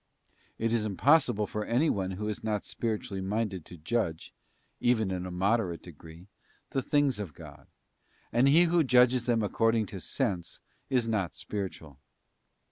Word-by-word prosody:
It 115 0 0
is 115 -2 +1
impossible 110 - +3
for 105 +1 -4
anyone 115 -6 +1
who 105 +1 -3
is 105 - -4
not 105 -2 -1
spiri 115 -2 -2
tually 95 -2 -6
minded 100 -3 -2
to 90 - -11
judge, 85 -1 -2 0.5
even 110 -5 +2
in 90 0 -3
a - - -5
moderate 95 -1 0
degree, 80 +1 -13 0.5
the 135 - 0
things 140 -3 +1
of 90 -9 -6
God; - - -12 0.7
and 125 +3 +4
he 155 +5 +6
who 170 -1 +3
judges 125 -2 +4
them 115 -2 +2
according 115 +1 +2
to 100 -1 -8
sense 95 -10 -2 0.3
is 125 -3 +1
not 95 -10 -1
spiritual. 80 -5 -6
105 Hz, 155 wpm, -29 LUFS, 95-120 Hz, 0.7 s, he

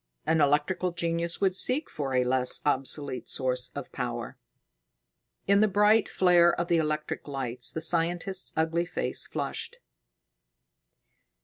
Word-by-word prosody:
An 160 -1 +2
electrical 150 +6 +1
genius 170 0 -1
would 190 -2 +1
seek 260 +9 +1
for 135 -3 -4
a 125 - +3
less 125 0 +1
obsolete 135 -1 0
source 125 -1 0
of - - -7
power." - - -5 1.1
In 200 +1 +4
the 215 - +4
bright 210 +2 +3
flare 175 -2 +4
of 175 - -2
the 170 - +3
electric 150 -1 -2
lights, 125 -3 -3
the 160 - -5
scientist's 175 +3 -1
ugly 165 +2 +1
face 175 - -2
flushed. - - -5
165 Hz, 130 wpm, -27 LUFS, 140-180 Hz, 1.1 s, In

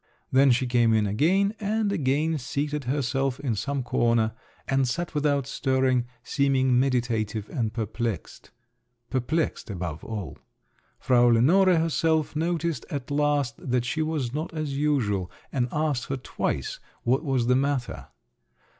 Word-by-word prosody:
Then 135 +1 +5
she 130 +1 +3
came 120 -2 +3
in 110 -1 +2
again, 175 - +2
and 210 0 0
again 155 -1 +1
seated 145 +2 -3
herself 135 0 -1
in 135 -5 -1
some 135 +6 -2
corner, 115 -2 +1 0.3
and 135 -1 +2
sat 170 +8 -3
without 145 -2 +1
stirring, 130 -2 +1 0.2
seeming 130 -3 +2
meditative 115 -5 0
and 115 -7 -1
perplexed… 115 -2 -4 0.6
perplexed 140 +4 -1
above 85 -5 -5
all. 105 -6 -6 0.6
Frau 120 -2 +4
Lenore 170 +11 +5
herself 160 -1 +1
noticed 165 -3 -1
at 140 -1 -5
last, 145 -3 +1
that 125 -1 -1
she 160 +6 -1
was 155 -6 -2
not 155 +3 -3
as 155 -3 -3
usual, 120 -11 0 0.2
and 125 -3 0
asked 150 -5 0
her 135 - -2
twice 130 - -3 0.2
what 130 +5 +1
was 135 -5 +1
the 125 +1 +3
matter. 135 -2 -1
135 Hz, 135 wpm, -26 LUFS, 120-150 Hz, 0.6 s, Then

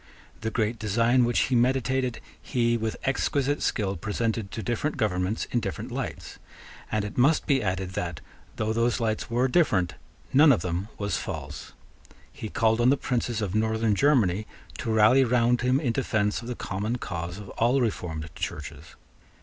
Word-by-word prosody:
The 110 - -2
great 110 0 -1
design 115 +4 +3
which 120 - +2
he 130 - +1
meditated, 130 0 +1 0.2
he 120 -1 +1
with 110 -1 -2
exquisite 140 +1 0
skill 100 -2 0
presented 110 +2 -2
to 110 - -5
different 120 +9 -1
governments 100 -2 0
in 120 - +2
different - - -5
lights; - - -5 0.5
and 105 -1 0
it 105 - -5
must 145 +6 +4
be 135 -3 +2
added 95 -1 -2
that, 85 -5 -4 0.4
though 110 +1 -1
those 115 +2 +1
lights 110 -2 -1
were 120 +2 +2
different, 100 - +2 0.4
none 145 +2 +7
of 110 -11 +2
them 90 +2 -2
was 100 -3 -1
false. - - -6 0.6
He 110 - -6
called 115 0 +2
on 120 - +5
the 140 - +4
princes 120 -4 -1
of 95 -2 -3
Northern 110 0 +1
Germany 110 -6 +2 0.3
to 115 - -2
rally 110 +5 +5
round 120 0 +2
him 125 +2 +2
in 130 -6 0
defence 110 -5 0
of 120 - -9
the 125 - -3
common 105 +4 -3
cause 85 -4 -5
of 105 -1 -9
all 120 +4 +2
reformed 90 -9 -2
Churches. - - -6
115 Hz, 170 wpm, -26 LUFS, 105-125 Hz, 0.6 s, none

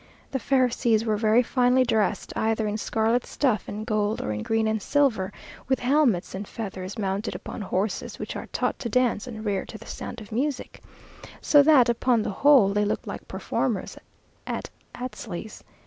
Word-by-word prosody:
The 265 - -1
Pharisees 240 -4 +2
were 215 -2 +1
very 220 +3 +3
finely 250 +1 +3
dressed, 220 -4 0
either 220 0 0
in 210 0 -1
scarlet 225 +3 +1
stuff 250 -8 0
and 215 +1 -5
gold 215 -1 0
or - - -3
in 105 0 -3
green 225 - +1
and 220 -1 0
silver, 220 -8 +1 0.4
with 265 -1 +1
helmets 250 - +2
and 195 +1 -5
feathers, 195 -2 -6
mounted 200 +1 -2
upon - - -7
horses 195 +1 -2
which - - -6
are - - -6
taught - - -2
to 235 - -3
dance 250 -1 +1
and 220 -3 -7
rear 200 -2 0
to - - -9
the - - -13
sound 240 - -7
of 215 -1 -12
music, 275 +5 -2 0.6
so 290 - +6
that 280 -4 +6
upon 235 -1 +2
the - - -2
whole 260 -1 +5
they 205 +1 +1
looked 205 - -1
like - - -7
performers - - -2 0.5
at - - -4 0.2
Astley's. 220 -5 -7
225 Hz, 180 wpm, -25 LUFS, 210-250 Hz, 0.6 s, so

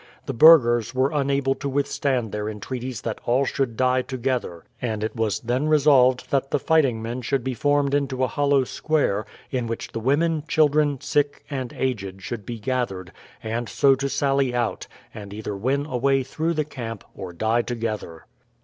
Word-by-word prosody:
The - - -3
burghers 120 -6 +6
were 130 +2 +2
unable 140 -2 +1
to 140 +1 -5
withstand 135 -4 -1
their 105 0 -3
entreaties 120 +2 -5
that 115 - -4
all 130 +3 +2
should 130 -4 -2
die 130 0 +3
together, 125 -9 -3 0.2
and 110 -3 -2
it 110 - -3
was 110 -3 0
then 125 +5 -1
resolved 130 -4 +4
that 135 -1 +1
the - - +1
fighting 135 -9 +2
men 120 +3 -4
should 130 +1 -1
be 130 0 -2
formed 145 +2 +1
into 135 -2 0
a - - +3
hollow 145 -1 +2
square, 130 -7 -1 0.2
in 125 -3 -1
which 115 0 -5
the 115 - -4
women, 150 +6 +1
children, 150 -2 +2
sick, 145 -1 0
and 130 -4 -3
aged 100 -7 -3
should 105 -4 -6
be 120 - -4
gathered, 105 -6 -3 0.3
and 115 +1 -3
so 140 -1 +4
to 135 +1 -2
sally 135 -2 +1
out, 120 -2 -2 0.3
and 100 -1 -9
either 105 -1 -5
win 135 +8 0
a 130 -5 -3
way 135 +1 +2
through 160 +6 -2
the 155 -1 0
camp 115 -7 -7
or 95 -3 -7
die 110 +7 +1
together. 110 -9 -5
130 Hz, 180 wpm, -24 LUFS, 115-140 Hz, 0.3 s, burghers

